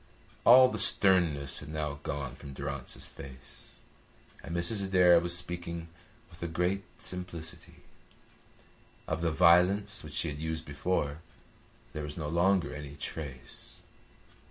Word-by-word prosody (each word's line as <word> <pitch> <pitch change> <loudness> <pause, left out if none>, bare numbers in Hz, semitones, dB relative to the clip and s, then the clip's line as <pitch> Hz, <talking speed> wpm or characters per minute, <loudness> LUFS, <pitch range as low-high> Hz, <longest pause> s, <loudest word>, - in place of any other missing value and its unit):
All 130 +2 +9
the - - -2
sternness 80 -8 +4
had - - -10
now 75 -2 -4
gone 70 -3 -4
from 70 -2 -10
Durrance's 70 -1 -5
face, 65 -2 -12 0.7
and 85 - -6
Mrs. 100 +4 +1
Adair 90 -3 +5
was 85 0 +2
speaking 85 -1 -4 0.4
with 85 - -16
a 85 - -2
great 90 +4 -1
simplicity. 90 -2 -7 1.2
Of 80 +1 -2
the 85 - +1
violence 90 +5 +3
which 75 -1 -10
she 80 - 0
had 75 0 -6
used 80 0 -3
before 70 0 -2 0.7
there 75 - -4
was 75 +1 -6
no 75 -3 -4
longer 85 -2 +2
any 75 -1 -8
trace. 70 -3 -8
80 Hz, 130 wpm, -30 LUFS, 75-90 Hz, 1.2 s, All